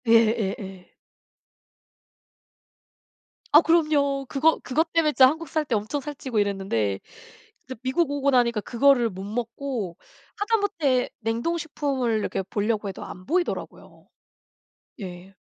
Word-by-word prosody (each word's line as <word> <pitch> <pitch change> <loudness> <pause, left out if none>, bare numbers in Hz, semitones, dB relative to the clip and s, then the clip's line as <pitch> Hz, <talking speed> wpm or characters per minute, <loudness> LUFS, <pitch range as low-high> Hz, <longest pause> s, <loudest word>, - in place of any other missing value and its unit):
예예예. 215 -4 +1 2.6
아. 300 - +9
그럼요. 295 -5 +2
그것, 310 +4 +2
그것 320 +5 0
때문에 325 -2 +3
진짜 260 -3 +7
한국 320 +3 -4
살 310 -1 0
때 250 - 0
엄청 215 +7 -2
살찌고 270 -5 -3
이랬는데 190 - 0 0.7
이제 260 - -7
미국 275 +5 +1
오고 280 -1 +1
나니까 235 -4 +3
그거를 245 +1 +3
못 190 -1 -8
먹고 230 -2 -4 0.4
하다못해 400 - +1
냉동식품을 260 0 -1
이렇게 195 - -2
보려고 210 +2 -1
해도 190 - -7
안 185 - -10
보이더라고요. 350 +4 -3 0.9
예. 185 0 -9
250 Hz, 270 characters per minute, -25 LUFS, 210-295 Hz, 2.6 s, 아